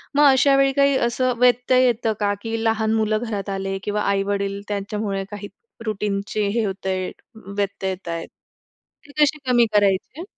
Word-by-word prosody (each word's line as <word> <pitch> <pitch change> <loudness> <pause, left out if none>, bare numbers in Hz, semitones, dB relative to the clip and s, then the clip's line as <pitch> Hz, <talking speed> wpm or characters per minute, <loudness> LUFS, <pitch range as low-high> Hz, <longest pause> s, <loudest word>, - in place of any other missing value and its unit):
मग 295 - +5
अशा 275 +1 +4
वेळी 275 0 +4
काही 280 0 +3
असं 255 +1 0
व्यत्यय 250 +1 +4
येतं 230 -2 +1
का, 205 -1 +1
की 225 0 -3
लहान 220 -1 +1
मुलं 215 -1 +1
घरात 200 -2 -4
आले 195 0 -3
किंवा 210 0 -1
आई-वडील 200 0 -1
त्यांच्यामुळे 200 -1 -3
काही 205 0 -6 0.4
रूटीनचे 205 0 -2
हे 225 +3 0
होतंय, 190 -1 -3 0.5
व्यत्यय 200 -1 -1
येत 185 -1 -8
आहेत. 165 0 -4 0.8
ते 285 - -14
कसे 300 +1 +4
कमी 240 -1 +5
करायचे? 205 - +1
210 Hz, 155 wpm, -22 LUFS, 200-240 Hz, 0.8 s, मग